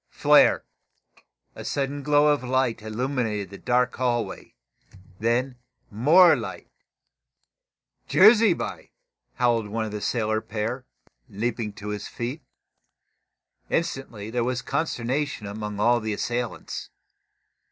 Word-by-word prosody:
Flare! - - +4 0.9
A - - -9
sudden 140 0 -2
glow 150 +1 +4
of 145 - -3
light 130 -3 0
illumined 110 -3 -2
the 100 - -9
dark 125 0 +1
hallway. 120 -2 -2 0.6
Then 125 +3 0 0.3
more 155 - +6
light. 95 -8 -7 1.4
"Jerusby!" 215 -1 +4 0.4
howled 120 -3 +1
one 110 +2 -2
of 110 - -6
the 105 0 -5
sailor 110 -1 0
pair, 115 +5 -4 0.4
leaping 110 +1 -3
to 105 0 -8
his 105 0 -4
feet. 125 +6 -5 1.3
Instantly 115 -9 -3
there 120 0 0
was 125 0 -2
consternation 140 -4 -2
among 105 0 -5
all 120 +3 +4
the 110 -1 -3
assailants. 120 +3 -4
120 Hz, 110 wpm, -25 LUFS, 110-135 Hz, 1.4 s, more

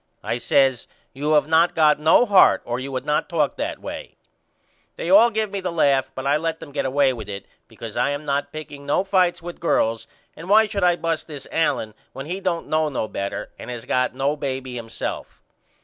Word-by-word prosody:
I 120 - -2
says 135 -4 +2 0.3
You 150 +3 -1
have 150 0 +3
not 165 +2 +3
got 150 -2 +4
no 160 +10 +5
heart 200 -4 +5
or 120 +1 -3
you 135 +1 -6
would 130 - -4
not 150 +4 0
talk 155 -5 0
that - - -3
way. - - -8 0.8
They 170 - -3
all 220 +5 +7
give 215 -2 -2
me 200 - -3
the 180 -1 -3
laugh 135 -5 +2
but 130 - -5
I 140 +2 +3
let 165 +1 -3
them 145 - -10
get 140 - -2
away 135 0 +2
with 110 -4 -8
it 100 -1 -6 0.2
because 115 -2 -9
I 125 +3 +1
am 145 +1 -4
not 140 0 -1
picking 145 -2 -9
no 145 +6 +2
fights 185 -3 +1
with 175 0 -8
girls 115 -9 0 0.3
and 170 +4 -10
why 220 +2 +6
should 200 -2 -3
I 175 -1 +4
bust 165 -2 -2
this 145 -4 -8
Allen 115 -9 0 0.2
when 135 +1 -7
he 180 +5 -4
don't 175 -3 -2
know 155 0 0
no 125 -6 -3
better 100 -1 -5
and - - -8
has 120 -2 -6
not - - -18
got 125 0 +1
no 140 +3 0
baby 130 -3 -4
himself. 115 -2 -6
150 Hz, 220 wpm, -22 LUFS, 130-170 Hz, 0.8 s, all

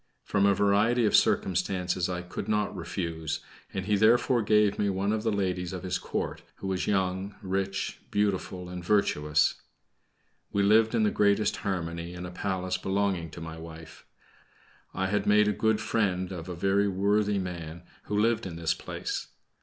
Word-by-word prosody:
From 100 -1 +2
a 100 - +4
variety 105 +5 +3
of 105 - +3
circumstances 90 -1 +1
I 90 -1 -3
could 90 - -6
not 105 -1 0
refuse, 80 -4 -3 0.3
and 95 -1 -4
he 105 0 +2
therefore 115 +3 +4
gave 105 -1 +3
me 100 - +2
one 100 +2 0
of 110 - -1
the 110 0 0
ladies 90 -3 -1
of 90 - -5
his 95 0 -1
Court, - - -3
who - - -9
was 95 -1 -1
young, 95 0 0
rich, 95 0 -2
beautiful, 95 -3 -1
and 90 0 -7
virtuous. 75 -6 +2 0.9
We 100 - +1
lived 110 +3 +4
in 110 - +3
the 105 - +3
greatest 105 +1 +2
harmony 85 -2 -3
in 90 0 -6
a 90 - -7
palace 95 0 -2
belonging 95 -3 0
to 85 - -10
my 80 0 -7
wife. 80 -1 -11 0.8
I 95 - -2
had 100 +1 0
made 105 0 +5
a 105 - +2
good 110 +1 +1
friend 95 -4 0
of 90 -1 -6
a 90 - -4
very 100 +3 +2
worthy 100 +2 +1
man 85 -3 -5 0.2
who 105 - -2
lived 115 -1 +2
in 85 - -7
this 85 0 0
place. - - -5
95 Hz, 175 wpm, -28 LUFS, 90-105 Hz, 0.9 s, made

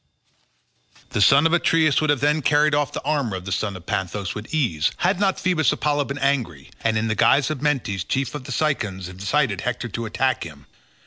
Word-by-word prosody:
The 105 - 0
son 140 +8 +6
of 165 - +3
Atreus 160 -4 +3
would 155 - 0
have 145 -3 +2
then 150 +2 +2
carried 150 +1 +3
off 145 -1 +1
the - - -6
armour 140 -8 -1
of 95 -1 -7
the 100 - -5
son 100 +1 -2
of 90 - -15
Panthous 95 +2 -3
with 105 +1 -8
ease, 95 - 0
had - - +1
not 195 -2 +1
Phoebus 180 -4 +2
Apollo 145 0 0
been 140 +1 -5
angry, 115 - -1
and 110 -1 +1
in 110 +1 0
the 110 - 0
guise 140 +6 +3
of 145 -4 -5
Mentes 125 - -1
chief 135 +6 -2
of 140 -4 -7
the 135 - -7
Cicons 110 - -1
incited 100 +5 -1
Hector 125 -1 -3
to 115 +2 -4
attack 130 +4 0
him. 70 -4 -11
135 Hz, 210 wpm, -22 LUFS, 100-150 Hz, -, son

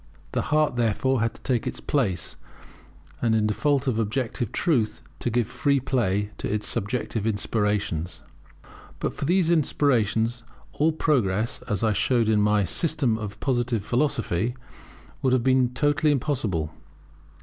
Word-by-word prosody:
The - - 0
heart, 150 -4 +1
therefore, 120 +2 +1
had 115 0 0
to - - -16
take 125 -4 0
its - - -4
place, 100 - -1 0.9
and 115 -2 +2
in 110 -1 +2
default 140 +6 +1
of 120 -4 0
objective 115 +1 -2
truth, 120 -10 0 0.2
to - - -1
give 120 0 +1
free 140 +5 +1
play 105 -6 0
to - - -3
its 105 0 -2
subjective 110 0 -1
inspirations. 105 -5 -1 0.8
But - - -2
for - - -4
these 175 +1 +3
inspirations, 120 -7 +1 0.3
all 155 +2 +2
progress, 115 -9 0
as 105 -3 -1
I 110 -1 +3
showed 115 +1 +2
in 105 -1 +3
my 105 0 +3
System 135 - +1
of 105 -1 -6
Positive 120 -5 0
Philosophy, 120 - 0 0.7
would 130 -2 +2
have 130 -2 +2
been 130 -1 +3
totally 145 +3 +2
impossible. 115 - -1
120 Hz, 145 wpm, -25 LUFS, 105-135 Hz, 0.9 s, these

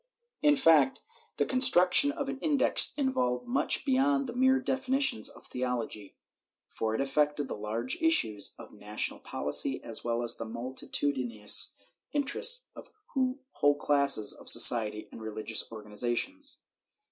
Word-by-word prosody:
In 295 -1 +3
fact, 215 - +3 0.4
the - - 0
construction 255 0 +4
of 285 -2 -6
an 275 0 -6
Index 290 -2 +3
involved 125 - -2
much 265 +4 0
beyond 275 +1 +1
the 240 - -7
mere 260 +1 +2
defi 265 +1 -4
nitions 270 - +1
of - - -15
theology, 120 -5 -5 0.5
for 110 0 -4
it - - -2
affected 145 +1 -1
the - - -6
large 110 +4 -3
issues 325 - +1
of - - -14
national 105 +1 -2
policy 75 - 0
as 115 - -4
well 120 0 -2
as 120 0 -1
the 115 - -6
multitudinous 120 -1 -1 0.4
interests 455 - +2
of - - -13 0.6
whole 145 0 +1
classes 140 -6 +2
of - - -8
society 105 -2 +5
and - - -12
refigious 110 +1 -3
organizations. 120 - -1
140 Hz, 135 wpm, -28 LUFS, -, 0.6 s, society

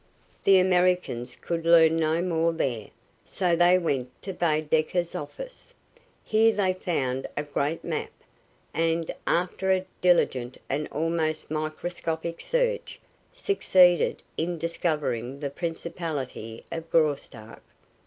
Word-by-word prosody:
The 195 -1 +7
Americans 180 -9 +2
could 170 -1 -4
learn 165 -1 +6
no 160 +2 +1
more 165 -2 +1
there, 120 -9 -2 0.4
so 180 -3 0
they 175 +2 +5
went 135 -8 -1
to 190 - -4
Baedecker's 160 +1 0
office. 185 - -8 0.5
Here 220 +1 +4
they 195 -4 +1
found 135 -8 -2
a 145 - 0
great 145 +2 -2
map, - - -3 0.6
and, 165 0 0
after 180 +2 +1
a 185 0 +1 0.2
diligent 130 -8 +2
and 150 +2 -2
almost 155 0 -2
microscopic 160 +1 -3
search, - - -1 0.3
succeeded 190 - +3
in 170 +2 -1
discovering 150 -6 -2
the 140 -2 -3
principality 160 -8 -5
of 165 0 -5
Graustark. 140 -8 -1
165 Hz, 115 wpm, -26 LUFS, 150-180 Hz, 0.6 s, The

